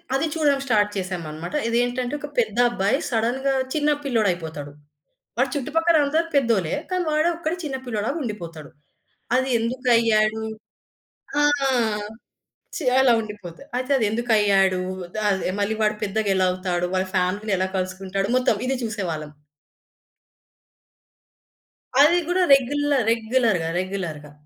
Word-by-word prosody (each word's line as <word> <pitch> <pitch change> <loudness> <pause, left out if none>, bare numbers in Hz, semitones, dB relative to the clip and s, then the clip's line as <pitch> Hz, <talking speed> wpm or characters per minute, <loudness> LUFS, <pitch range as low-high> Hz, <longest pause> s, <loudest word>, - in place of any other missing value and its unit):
అది 275 +4 +1
చూడడం 290 -3 +2
స్టార్ట్ 210 -5 +2
చేసామనమాట. 175 - -5
ఇదేంటంటే 245 +2 0
ఒక 290 - -6
పెద్ద 220 -1 0
అబ్బాయి 205 +1 +1
సడెన్‌గా 250 +3 0 0.2
చిన్న 300 -1 +1
పిల్లోడైపోతాడు. 175 - -1 0.7
వాడు 260 +2 +2
చుట్టుపక్కలందరూ 310 +2 +2
పెద్దోలే 230 - +2 0.2
కానీ 365 -1 0
వాడొక్కడే 330 +2 0
చిన్న 285 -4 -3
పిల్లోడులాగా 235 +5 -2
ఉండిపోతాడు. 165 - -7 0.7
అది 260 +1 +2
ఎందుకు 250 +3 -3
అయ్యాడు? 220 -1 +2 1.0
ఆ! - - +4 1.4
చె 325 - -4
అలా 265 -2 +5
ఉండిపోతాడు. 210 - -9
అయితే 255 +2 -3
అది 230 - +1
ఎందుకయ్యాడు? 205 -5 +2 0.4
ద - - -4
అదే 190 -2 0
మళ్ళీ 205 +2 0
వాడు 210 0 +2
పెద్దగా 210 +1 -1
ఎలా 185 0 +3
అవుతాడు? 180 -1 -2
వాడి 185 0 0
ఫ్యామిలీని 195 +3 0
ఎలా 185 +1 0
కలుసుకుంటాడు? 190 +1 -2
మొత్తం 255 -3 +2
ఇది 265 - 0
చూసేవాళ్ళం. 170 -9 -4 2.7
అది 330 +4 +6
గూడా 365 +1 +2
రెగ్యులర్ 280 0 +2
రెగ్యులర్‌గా, 225 -6 +1
రెగ్యులర్‌గా. 175 -6 -5
220 Hz, 120 wpm, -23 LUFS, 190-270 Hz, 2.7 s, అది